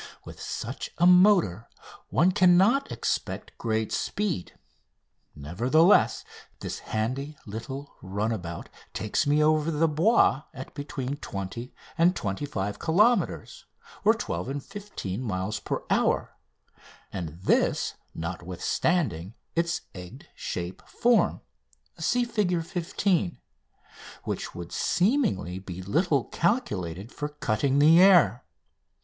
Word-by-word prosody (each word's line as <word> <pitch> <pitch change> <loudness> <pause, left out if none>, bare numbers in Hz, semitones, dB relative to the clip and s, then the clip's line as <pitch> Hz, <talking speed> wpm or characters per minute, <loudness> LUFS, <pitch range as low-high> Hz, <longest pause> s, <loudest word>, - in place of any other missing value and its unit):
With - - -10
such - - -5
a 170 - +3
motor 180 - +5 0.4
one 180 +4 +3
cannot 195 +8 +4
expect - - -3
great 110 -1 -1
speed; 195 - -2 0.8
nevertheless, 120 - +3 0.3
this - - -5
handy 130 +7 -3
little 130 +7 -7
runabout 95 -3 -3 0.3
takes 110 +7 0
me 150 +1 +4
over 155 0 +3
the 165 +1 +2
Bois 160 - +3
at 130 0 -8
between 140 -1 -4
20 110 +1 -6 0.3
and 175 +2 +5
25 100 -1 -3
kilometres 205 +4 +1 0.5
(12 85 +8 -3
and 140 0 -4
15 195 - -6
miles) 105 -2 -2
per - - -3
hour, - - +1 0.8
and 85 -3 -5
this - - +2 0.2
notwithstanding 90 - -2 0.2
its 170 +1 0
egg 90 -2 -10
shaped 90 +1 -6
form 240 -2 +2 0.6
(Fig. 210 -3 +1
15), 175 -1 -1 0.9
which - - -4
would 85 0 -7
seemingly 180 - +1
be 95 -1 -8
little 145 - +1
calculated 110 - -1
for 150 - -4
cutting 140 -1 0
the 160 +4 +7
air. 170 - +6
140 Hz, 105 wpm, -27 LUFS, -, 0.9 s, the